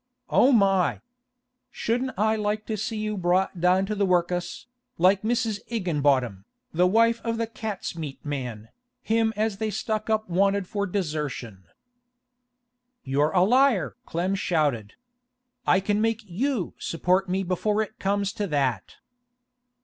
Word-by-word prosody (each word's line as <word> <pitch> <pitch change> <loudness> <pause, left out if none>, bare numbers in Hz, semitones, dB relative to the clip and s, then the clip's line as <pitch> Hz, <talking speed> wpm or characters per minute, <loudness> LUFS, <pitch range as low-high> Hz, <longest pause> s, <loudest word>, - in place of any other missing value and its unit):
Oh 265 - +5
my! 195 -6 +3 0.7
Shouldn't 250 +2 -2
I 220 +2 +2
like 210 0 -2
to 220 - -2
see 215 +2 -3
you 215 0 -2
brought 185 -1 0
down 185 +2 +3
to 215 - -3
the 205 -1 0
work'us, 180 -1 0 0.3
like 185 +3 +4
Mrs. 225 -2 0
Igginbottom, 145 - 0 0.3
the 180 +3 +4
wife 230 +4 +3
of 230 -1 -1
the 230 - 0
cat's 215 -5 -5
meat 155 -5 -6
man, 125 -7 -5 0.3
him 225 0 +2
as 215 -1 -1
they 220 +1 -1
stuck 215 +1 -3
up 220 0 +1
wanted 195 +2 +2
for 200 +1 -2
desertion!' 150 - -4 1.4
'You're 140 +3 +1
a 180 0 +3
liar!' 250 0 +3
Clem 175 +3 -1
shouted. 150 - 0 0.7
'I 185 - +5
can 205 +2 0
make 225 0 0
you 215 +3 -2
support 180 +3 0
me 190 +2 0
before 205 +4 0
it 220 - -11
comes 200 +1 0
to 205 - -2
that. 140 -6 -1
195 Hz, 140 wpm, -25 LUFS, 170-215 Hz, 1.4 s, Oh